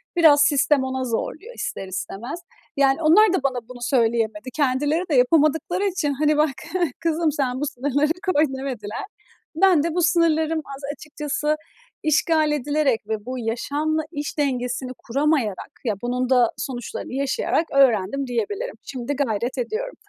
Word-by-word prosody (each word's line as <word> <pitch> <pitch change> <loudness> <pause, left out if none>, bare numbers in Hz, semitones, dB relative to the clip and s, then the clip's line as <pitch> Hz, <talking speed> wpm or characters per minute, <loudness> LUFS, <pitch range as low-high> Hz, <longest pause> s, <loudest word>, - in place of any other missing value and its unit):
biraz 305 -4 +6
sistem 285 -1 +3
ona 260 0 -2
zorluyor, 315 - -4
ister 195 - -4
istemez. 225 - -5 0.4
Yani 275 +2 +3
onlar 370 +6 +6
da 325 - 0
bana 255 -2 0
bunu 245 -1 -10
söyleyemedi. 235 +2 0
Kendileri 290 +4 +1
de 290 - +2
yapamadıkları 310 +7 +3
için, 345 -7 0
hani, 300 +2 +2
"Bak 305 0 +4 0.5
kızım, 330 -1 +1
sen 260 -1 -1
bu - - +1
sınırları 285 +3 0 0.2
koy." 295 - +4
demediler. 245 - -5 0.5
Ben 355 -4 +4
de 335 -1 -1
bu 355 - +2
sınırlarım 320 -2 +2 0.2
az - - -15
açıkçası, 300 0 -2 0.5
işgal 310 0 +2
edilerek 290 -3 +1
ve 215 0 -3
bu 255 0 -4
yaşamla 290 +7 -1
iş 290 0 -5
dengesini 255 -2 -1
kuramayarak, 270 - -1
ya, 215 -3 0
bunun 250 +1 -1
da 245 -3 +4
sonuçlarını 250 -1 -5
yaşayarak 280 +4 0
öğrendim 270 0 +3
diyebilirim. 410 - -3
Şimdi 260 +1 -4
gayret 250 -2 -1
ediyorum. 445 - -3
285 Hz, 145 wpm, -23 LUFS, 250-310 Hz, 0.5 s, biraz